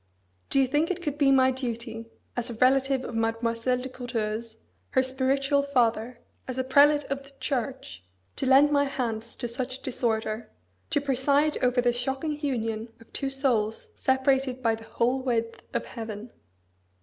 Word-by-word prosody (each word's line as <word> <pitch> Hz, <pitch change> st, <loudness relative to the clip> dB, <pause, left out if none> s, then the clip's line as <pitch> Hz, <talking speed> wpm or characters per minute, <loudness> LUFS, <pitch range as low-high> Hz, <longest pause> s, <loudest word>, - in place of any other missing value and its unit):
Do 275 Hz, -, +2 dB
you 270 Hz, -, +5 dB
think 295 Hz, +5 st, +1 dB
it 365 Hz, -1 st, -3 dB
could 295 Hz, -2 st, -3 dB
be 275 Hz, -2 st, +5 dB
my 260 Hz, -1 st, +5 dB
duty, 235 Hz, -3 st, -5 dB, 0.3 s
as 245 Hz, 0 st, -2 dB
a 235 Hz, -, -5 dB
relative 265 Hz, +2 st, +3 dB
of -, -, -6 dB
Mademoiselle 230 Hz, +2 st, 0 dB
de 250 Hz, +1 st, -4 dB
Courteheuse, 230 Hz, -3 st, -4 dB, 0.3 s
her 260 Hz, -, +3 dB
spiritual 275 Hz, +2 st, +1 dB
father, 245 Hz, -3 st, +1 dB, 0.3 s
as 255 Hz, -1 st, -4 dB
a 260 Hz, -, +1 dB
prelate 290 Hz, +3 st, +5 dB
of 275 Hz, 0 st, -1 dB
the 275 Hz, 0 st, -17 dB
Church, 255 Hz, -, -3 dB, 0.3 s
to 270 Hz, -, -2 dB
lend 275 Hz, +3 st, +6 dB
my 285 Hz, -1 st, +4 dB
hands 230 Hz, -4 st, -3 dB
to 240 Hz, -, -4 dB
such 255 Hz, +2 st, -2 dB
disorder, 225 Hz, -3 st, -1 dB, 0.4 s
to 290 Hz, -3 st, +1 dB
preside 280 Hz, +2 st, +2 dB
over 250 Hz, 0 st, +3 dB
the 245 Hz, 0 st, +2 dB
shocking 270 Hz, +5 st, -2 dB
union 225 Hz, -5 st, -2 dB
of 230 Hz, -, -19 dB
two 275 Hz, -, -1 dB
souls 245 Hz, -6 st, 0 dB
separated 265 Hz, -1 st, +1 dB
by 225 Hz, -1 st, +3 dB
the 225 Hz, 0 st, -7 dB
whole 250 Hz, +4 st, 0 dB
width 230 Hz, -3 st, -1 dB
of -, -, -2 dB
heaven?" 225 Hz, -1 st, -7 dB
255 Hz, 165 wpm, -27 LUFS, 230-270 Hz, 0.4 s, lend